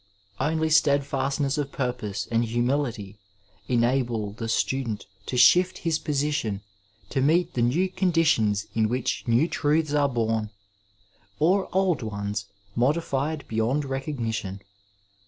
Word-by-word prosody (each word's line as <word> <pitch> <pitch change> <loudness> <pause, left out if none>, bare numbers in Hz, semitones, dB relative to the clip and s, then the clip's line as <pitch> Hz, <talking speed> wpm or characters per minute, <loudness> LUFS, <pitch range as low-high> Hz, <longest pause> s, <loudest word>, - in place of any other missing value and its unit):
^ - - 0
Only 160 +1 0
steadfast 140 -2 +2
ness 140 +1 0
of 140 -1 -3
purpose 115 -6 -3
and 115 0 +2
humility 120 -3 -1 0.5
enable 120 -3 +1
the 115 +2 -6
student 120 -2 -1 0.2
to 125 - -2
shift 180 +8 +5
his 160 -1 +1
portion 140 -8 -1 0.5
to 135 - 0
meet 165 +5 +2
the 120 - -1
new 145 +11 +2
conditions 165 - +2
in 110 -1 +1
which 125 +2 -1
new 120 +7 +3
truths 155 -1 +1
are 145 -1 +3
bom, 110 -3 -1 0.9
or 185 +5 +2
old 185 -6 +1
ones 100 -1 -4 0.3
modified 145 +3 0
beyond 115 +6 0
recognition.. 115 -8 -3
135 Hz, 125 wpm, -25 LUFS, 115-150 Hz, 0.9 s, shift